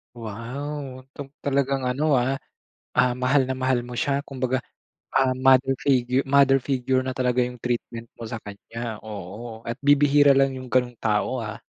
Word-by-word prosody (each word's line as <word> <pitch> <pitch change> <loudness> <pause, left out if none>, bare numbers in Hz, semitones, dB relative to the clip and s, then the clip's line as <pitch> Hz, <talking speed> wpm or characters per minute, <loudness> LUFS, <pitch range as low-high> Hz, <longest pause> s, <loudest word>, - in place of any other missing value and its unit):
Wow, 130 +4 -6
'tong 140 -1 -8
talagang 135 -2 0
ano, 140 +1 +2
ah, 130 +3 0 0.6
ah, 125 - +4
mahal 130 +3 +2
na 130 - -3
mahal 130 -1 0
mo 120 0 -5
siya 140 0 0
kumbaga, 130 -2 -2 0.5
ah, 135 -1 +2
mother 130 +1 +4
figure 130 -1 +2
mother 135 -1 +4
figure 130 -1 0
na 130 -1 -4
talaga 125 -1 +2
'yong 125 0 -2
treatment 120 -1 -3
mo 115 -1 -8
sa 115 - -4
kanya, 110 +2 -7
oo, 110 +2 -8
at 115 - -2
bibihira 145 -1 +5
lang 135 -1 +3
'yong 130 -1 -8
ganung 125 0 +1
tao, 110 +3 0
ah. 110 -1 -5
130 Hz, 165 wpm, -24 LUFS, 120-135 Hz, 0.6 s, bibihira